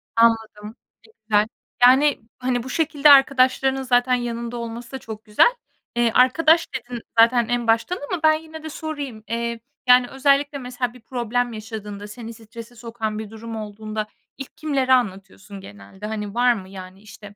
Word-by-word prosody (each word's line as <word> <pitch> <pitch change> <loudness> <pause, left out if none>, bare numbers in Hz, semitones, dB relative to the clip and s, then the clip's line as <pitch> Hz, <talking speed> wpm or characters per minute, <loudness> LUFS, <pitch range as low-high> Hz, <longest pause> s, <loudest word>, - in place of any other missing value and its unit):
Anladım. 225 -2 +1 0.3
Ne 445 - -21 0.2
güzel. 210 0 +3 0.4
Yani 265 +3 +5 0.2
hani, 250 -1 -1
bu 260 - -8
şekilde 300 0 +2
arkadaşlarının 270 -1 +4
zaten 245 0 +2
yanında 235 -1 -4
olması 235 0 -7
da 265 - -5
çok 220 -2 -9
güzel. 215 - +4 0.4
Eee, 240 -1 +2
arkadaş 320 +6 +4
dedin 245 -2 -6 0.2
zaten 235 0 +5
en 240 -1 -1
baştan 230 +11 +1
ama 350 -3 -3
ben 315 0 +6
yine 315 0 -7
de 315 - -6
sorayım. 290 -8 -6
Eee, 235 +1 -3 0.3
yani 250 0 +6
özellikle 280 +2 +1
mesela 250 -2 -4
bir 250 - -16
problem 245 0 -2
yaşadığında, 210 -2 -7
seni 230 +2 -9
strese 230 +1 -12
sokan 225 -2 -5
bir 220 -1 -7
durum 225 +1 -8
olduğunda 215 0 -5 0.3
ilk 275 - -10
kimlere 275 -4 +1
anlatıyorsun 195 -3 -2
genelde? 100 - -12
Hani, 210 -2 -5
var 245 +1 +4
mı 190 -5 -8
yani 190 0 -11
işte, 205 -1 -13
235 Hz, 165 wpm, -22 LUFS, 215-260 Hz, 0.4 s, ben